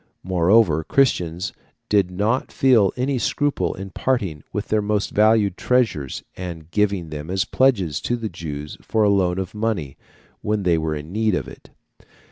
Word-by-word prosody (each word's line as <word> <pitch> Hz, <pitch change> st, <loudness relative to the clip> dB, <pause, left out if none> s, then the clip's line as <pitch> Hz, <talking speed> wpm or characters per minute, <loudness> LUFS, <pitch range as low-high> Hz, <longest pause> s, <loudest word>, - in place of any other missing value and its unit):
Moreover, 90 Hz, -2 st, +3 dB
Christians 90 Hz, -, +1 dB, 0.3 s
did 100 Hz, -3 st, +2 dB
not 105 Hz, +7 st, -1 dB
feel 120 Hz, -8 st, +4 dB
any 130 Hz, +1 st, 0 dB
scruple 145 Hz, +3 st, 0 dB
in 95 Hz, 0 st, -7 dB
parting 95 Hz, -, -1 dB
with 105 Hz, -, -4 dB
their 110 Hz, -1 st, +2 dB
most 105 Hz, 0 st, -1 dB
valued 105 Hz, -3 st, +3 dB
treasures, 115 Hz, -, 0 dB
and 85 Hz, -3 st, -7 dB
giving 100 Hz, -5 st, 0 dB
them 75 Hz, +1 st, -7 dB
as 95 Hz, 0 st, 0 dB
pledges 100 Hz, -, +1 dB
to 120 Hz, -, -1 dB
the 115 Hz, -2 st, -4 dB
Jews 75 Hz, -5 st, -7 dB
for 110 Hz, -, 0 dB
a 105 Hz, -, +4 dB
loan 95 Hz, -3 st, +2 dB
of 95 Hz, -1 st, -4 dB
money 105 Hz, -11 st, -2 dB, 0.4 s
when 105 Hz, -1 st, -1 dB
they 85 Hz, -3 st, +2 dB
were 80 Hz, -1 st, -2 dB
in 75 Hz, +2 st, -8 dB
need 110 Hz, -1 st, +1 dB
of -, -, -3 dB
it. -, -, -13 dB
100 Hz, 165 wpm, -22 LUFS, 85-110 Hz, 0.4 s, feel